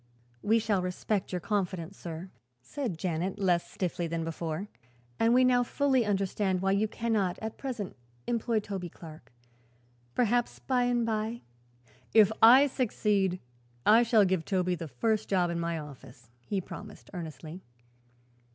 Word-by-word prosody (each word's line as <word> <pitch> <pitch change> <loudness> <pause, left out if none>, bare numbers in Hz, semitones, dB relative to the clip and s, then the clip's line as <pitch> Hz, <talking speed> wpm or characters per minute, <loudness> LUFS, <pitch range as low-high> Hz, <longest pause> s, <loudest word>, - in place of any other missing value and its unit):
"We 220 +2 +3
shall 210 -4 +1
respect 180 +2 -2
your 180 -1 -2
confidence, 185 -2 -2
sir," 170 +2 -7 0.3
said 190 - -4
Janet, 180 +3 -2
less 180 -4 +1
stiffly 175 -2 -2
than 165 0 -2
before, 165 +3 -4 0.5
"and 230 - +4
we 255 +1 +5
now 250 -1 +4
fully 260 0 +1
understand 195 -1 0
why 195 +1 +1
you 200 +2 +2
cannot, 215 -5 -1
at 220 0 -6
present, 245 -8 -4 0.3
employ 230 -2 0
Toby 195 -4 -5
Clark. 155 -3 -13 0.8
Perhaps, 240 0 +1
by 250 -2 0
and 240 -1 +1
by 225 +1 -2 0.4
" 120 - -36 0.3
"If 215 -2 +7
I 255 +5 +9
succeed, 210 -8 0 0.5
I 220 +3 +7
shall 225 -3 +4
give 185 -3 +1
Toby 185 0 0
the 165 -2 -4
first 215 - -1
job 180 -3 +2
in 170 - -2
my 170 0 -1
office," 135 -5 -11 0.2
he 200 - 0
promised 205 +3 -10
earnestly. 165 0 -7
195 Hz, 150 wpm, -29 LUFS, 175-225 Hz, 0.8 s, I